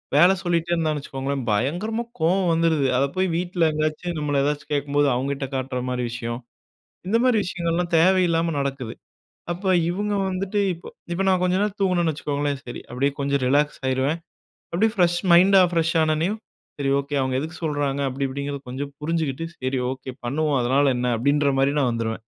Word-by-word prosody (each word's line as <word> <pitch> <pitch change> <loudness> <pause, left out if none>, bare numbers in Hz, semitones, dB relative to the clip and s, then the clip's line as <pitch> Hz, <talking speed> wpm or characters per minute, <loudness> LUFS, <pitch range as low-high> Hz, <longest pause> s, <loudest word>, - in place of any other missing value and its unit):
வேலை 175 +5 +7
சொல்லிட்டே 170 -1 0
இருந்தான்னு 155 -3 0
வச்சுக்கோங்களேன். 135 -1 -4
பயங்கரமாக 180 - -1
கோவம் 175 +3 +2
வந்துருது. 165 -4 +2
அதை 140 +2 +2
போய் 185 0 +2
வீட்ல 175 -1 -1
எங்கேயாச்சும், 155 +3 -2
நம்மள 145 -2 0
ஏதாச்சும் 145 +1 -2
கேட்கும்போது 145 0 +1
அவங்ககிட்ட 135 +2 -2
காட்டுற 130 -1 -2
மாதிரி 125 -1 -2
விஷயம். 120 0 -4 0.7
இந்த 220 - +3
மாதிரி 245 -4 +4
விஷயங்கள்லாம் 175 -1 -2
தேவையில்லாம 170 -2 +3
நடக்குது. 135 -4 -3 0.6
அப்போ, 190 +3 -4 0.2
இவுங்க 205 +3 -1
வந்துட்டு 195 +2 -1
இப்போ, 170 - -12 0.2
இப்போ 185 - 0
நான் 185 -1 +3
கொஞ்ச 180 0 +2
நேரம் 205 -1 -1
தூங்குனேன்னு 175 -4 +2
வச்சுக்கோங்களேன். 145 -1 -2
சரி, 120 - -7
அப்டியே, 135 +3 0
கொஞ்சம் 140 -1 0
ரிலாக்ஸ் 145 +3 +2
ஆகிருவேன். 130 +5 0 0.6
அப்டியே 220 +5 +2
ஃப்ரெஷ் 175 -2 +3
மைண்டா, 190 +2 +7
ஃப்ரெஷ் 165 0 +1
ஆனோடனேயும், 160 +7 +1 0.4
"சரி 140 - 0
ஓகே, 140 +1 -4
அவங்க 130 -1 -1
எதுக்கு 160 +4 -6
சொல்றாங்க?" 145 -2 -1
அப்டி 135 +1 -2
இப்டிங்கிறது 140 0 -5
கொஞ்சம் 140 +3 -5
புரிஞ்சுட்டு, 160 -1 -1
"சரி 130 0 -1
ஓகே, 130 -1 -7
பண்ணுவோம் 145 +2 +1
அதனால 135 +2 +3
என்ன?" 125 -1 0
அப்டின்ற 140 +2 +2
மாரி 140 +1 +3
நான் 125 -3 +2
வந்துருவேன். 115 -1 -2
150 Hz, 165 wpm, -23 LUFS, 135-175 Hz, 0.7 s, வேலை